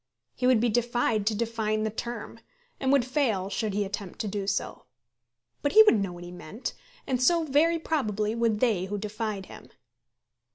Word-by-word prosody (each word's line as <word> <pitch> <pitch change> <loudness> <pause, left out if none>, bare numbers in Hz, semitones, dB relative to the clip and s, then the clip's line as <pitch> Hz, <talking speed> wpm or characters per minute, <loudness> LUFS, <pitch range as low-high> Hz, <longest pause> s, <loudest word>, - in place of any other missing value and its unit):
He 250 - 0
would 255 -3 +5
be 240 +2 +2
defied 230 -2 +1
to 220 - +2
define 220 -1 -1
the 220 - -1
term, 235 +1 -6 0.4
and 265 -1 +1
would 275 -4 +4
fail 230 -8 0
should 210 +1 -1
he 205 0 +1
attempt 195 -1 -6
to 215 - -3
do 200 -1 -3
so. 200 0 -2 0.8
But 285 - 0
he 440 - +10
would 420 - +5
know 195 -2 -2
what 175 0 -10
he 175 - -9
meant, 180 +6 -6 0.3
and 255 -2 -1
so 335 +5 +4
very 315 +3 +3
probably 215 -10 -1
would 230 -2 0
they 215 -8 +2
who 205 +2 -3
defied 210 -1 -4
him. - - -13
220 Hz, 190 wpm, -27 LUFS, 205-250 Hz, 0.8 s, he